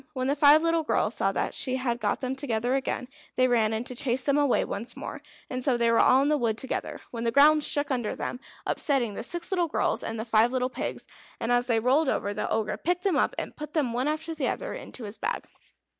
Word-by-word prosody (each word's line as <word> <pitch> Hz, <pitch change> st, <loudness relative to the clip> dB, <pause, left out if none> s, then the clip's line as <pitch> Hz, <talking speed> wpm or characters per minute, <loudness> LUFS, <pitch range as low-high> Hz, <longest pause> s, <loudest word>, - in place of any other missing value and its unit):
When 255 Hz, -2 st, -2 dB
the 280 Hz, +2 st, +1 dB
five 295 Hz, +2 st, +6 dB
little 330 Hz, 0 st, +2 dB
girls 305 Hz, -, 0 dB
saw -, -, +1 dB
that -, -, -1 dB
she 255 Hz, -1 st, -1 dB
had 245 Hz, -2 st, -1 dB
got 210 Hz, -3 st, -1 dB
them 260 Hz, 0 st, -2 dB
together 245 Hz, -3 st, -1 dB
again, 265 Hz, -2 st, -2 dB, 0.3 s
they 255 Hz, -, +4 dB
ran 225 Hz, -3 st, +2 dB
in 220 Hz, +1 st, -1 dB
to 250 Hz, -, -6 dB
chase 250 Hz, 0 st, -1 dB
them 280 Hz, -, +2 dB
away 290 Hz, -3 st, +2 dB
once 230 Hz, +5 st, -4 dB
more, -, -, -6 dB, 0.3 s
and 255 Hz, -1 st, -3 dB
so 255 Hz, -2 st, +2 dB
they 235 Hz, -1 st, +2 dB
were 230 Hz, -, +4 dB
all 260 Hz, +2 st, +5 dB
in 285 Hz, -, +1 dB
the 300 Hz, -1 st, +2 dB
wood 225 Hz, -3 st, 0 dB
together, 265 Hz, -, -3 dB
when 230 Hz, -1 st, -4 dB
the 230 Hz, -, +2 dB
ground 295 Hz, +4 st, +5 dB
shook 290 Hz, 0 st, 0 dB
under 240 Hz, -5 st, -1 dB
them, 245 Hz, -, -4 dB, 0.3 s
upsetting 255 Hz, -7 st, 0 dB
the -, -, -5 dB
six 345 Hz, +10 st, -3 dB
little 355 Hz, -3 st, +1 dB
girls -, -, 0 dB
and 225 Hz, 0 st, -4 dB
the 220 Hz, -, -3 dB
five 225 Hz, +1 st, +3 dB
little 255 Hz, 0 st, -1 dB
pigs; -, -, -4 dB, 0.3 s
and 230 Hz, -, -1 dB
as 245 Hz, 0 st, +2 dB
they 230 Hz, -2 st, +2 dB
rolled 265 Hz, +6 st, +3 dB
over 205 Hz, -4 st, -1 dB
the 210 Hz, -, -3 dB
Ogre 215 Hz, -1 st, -1 dB
picked 355 Hz, +1 st, -1 dB
them 390 Hz, -, +2 dB
up, -, -, +1 dB
and -, -, -5 dB
put 300 Hz, 0 st, -8 dB
them 280 Hz, -7 st, 0 dB
one 250 Hz, +3 st, 0 dB
after 310 Hz, +2 st, -2 dB
another 400 Hz, -, -2 dB
into 250 Hz, -, -8 dB
his 205 Hz, +1 st, -6 dB
bag. 475 Hz, +3 st, -2 dB
255 Hz, 250 wpm, -27 LUFS, 235-290 Hz, 0.3 s, five